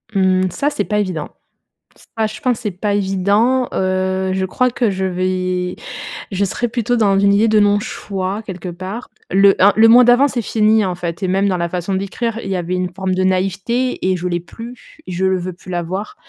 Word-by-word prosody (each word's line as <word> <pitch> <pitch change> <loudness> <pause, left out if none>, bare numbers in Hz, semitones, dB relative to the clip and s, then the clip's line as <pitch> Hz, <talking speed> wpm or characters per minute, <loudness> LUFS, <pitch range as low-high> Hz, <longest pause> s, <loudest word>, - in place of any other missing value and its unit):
Mmh, 185 -1 +2
ça, 280 +11 -1
c'est 215 - -2
pas 210 -1 0
évident. 180 -7 -3 0.9
Ça, 220 - +2
je 215 - -8
pense, 250 -5 0
c'est 210 - -2
pas 200 +3 -2
évident, 205 +6 +1
heu, 190 0 0
je 190 0 -1
crois 250 +7 +1
que 240 -1 0
je 190 -1 -2
vais 185 0 -1 0.6
je 195 +1 0
serais 220 +5 -1
plutôt 240 0 -1
dans 200 -4 +3
une 200 0 +4
idée 215 +3 +3
de 215 - +4
non-choix 205 -1 -1
quelque 185 -3 -7
part. 185 +7 -7 0.2
Le 195 +1 +5
un 200 +1 +6
le 225 +1 +6
moi 245 +2 +8
d'avant, 245 +3 +5
c'est 250 -3 -2
fini, 220 0 +2
hein, 190 - 0
en 180 - -3
fait, 170 +1 -5
et 190 - 0
même 195 +2 +1
dans 185 - 0
la 170 0 -2
façon 180 +2 -3
d'écrire, 215 +4 -2
il 195 - -5
y 190 - -1
avait 180 0 -3
une 180 0 -1
forme 190 -1 -2
de 185 0 0
naïveté 195 +7 0
et 185 - +1
je 180 +1 -3
l'ai 175 -1 -1
plus, 230 +8 -12
je 185 +1 -1
le 190 0 +2
veux 180 +1 -5
plus 185 - -15
l'avoir. 180 +3 -4
195 Hz, 215 wpm, -18 LUFS, 185-215 Hz, 0.9 s, moi